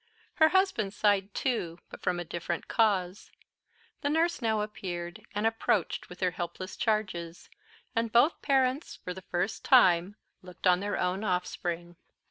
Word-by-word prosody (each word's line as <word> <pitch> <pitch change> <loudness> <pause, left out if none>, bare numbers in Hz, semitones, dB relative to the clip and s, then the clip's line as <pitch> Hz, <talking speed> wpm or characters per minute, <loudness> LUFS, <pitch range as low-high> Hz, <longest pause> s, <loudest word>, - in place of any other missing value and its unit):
Her 315 -1 +6
husband 330 - +1
sighed 205 -2 +2
too; 180 -10 -1
but - - -10
from 180 -1 0
a 175 - -4
different 170 +1 -4
cause. 195 -4 +1 0.7
The 285 - 0
nurse 330 +1 +1
now 220 -2 +1
appeared, 175 -5 -5
and 210 +1 0
approached 225 -4 0
with 180 - -12
her 180 -1 +2
helpless 175 +2 -5
charges; 185 -6 -2 0.4
and 230 0 0
both 240 +8 +4
parents, 270 +2 +1
for 180 - -6
the 190 - -9
first 180 +3 -2
time 185 -7 +5 0.3
looked 180 -1 -11
on 180 -1 +5
their 205 +1 -2
own 180 +3 -1
offspring. 175 -2 -2
195 Hz, 150 wpm, -29 LUFS, 175-225 Hz, 0.7 s, Her